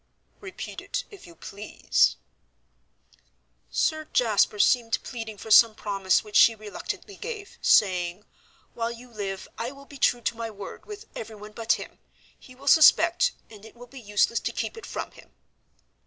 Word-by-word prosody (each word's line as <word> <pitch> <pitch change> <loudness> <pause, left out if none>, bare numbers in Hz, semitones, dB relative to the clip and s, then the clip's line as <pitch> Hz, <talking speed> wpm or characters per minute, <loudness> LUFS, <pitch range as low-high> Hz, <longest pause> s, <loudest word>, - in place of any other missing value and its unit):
"Repeat 390 -2 -8
it, - - -3
if 400 - -13
you 170 - -15
please." 200 +5 0 1.5
"Sir 310 0 0
Jasper 220 -6 +2
seemed 230 +2 +3
pleading 225 -4 -7
for 220 - -9
some 225 0 +7
promise 195 -3 0
which 210 -1 -12
she 230 - +7
reluctantly 215 - -7
gave, 430 -3 -7
saying, 180 -1 +3 0.5
'While 230 0 -2
you 240 +1 -10
live 195 -3 -5
I 235 +2 -3
will 275 0 -14
be 280 -1 -13
true 245 - +2
to 230 - -2
my 230 0 -5
word 205 -2 -10
with 420 +1 -9
everyone 215 -1 -8
but 225 +1 +1
him. - - -7 0.4
He 255 - -16
will 275 +2 -14
suspect, 330 - +6 0.2
and 210 -2 -13
it 225 - -14
will 245 +1 -12
be 260 +1 -12
useless 210 +2 +1
to - - -3
keep - - -4
it 450 - -10
from - - -5
him.' - - -17
230 Hz, 165 wpm, -26 LUFS, 210-270 Hz, 1.5 s, some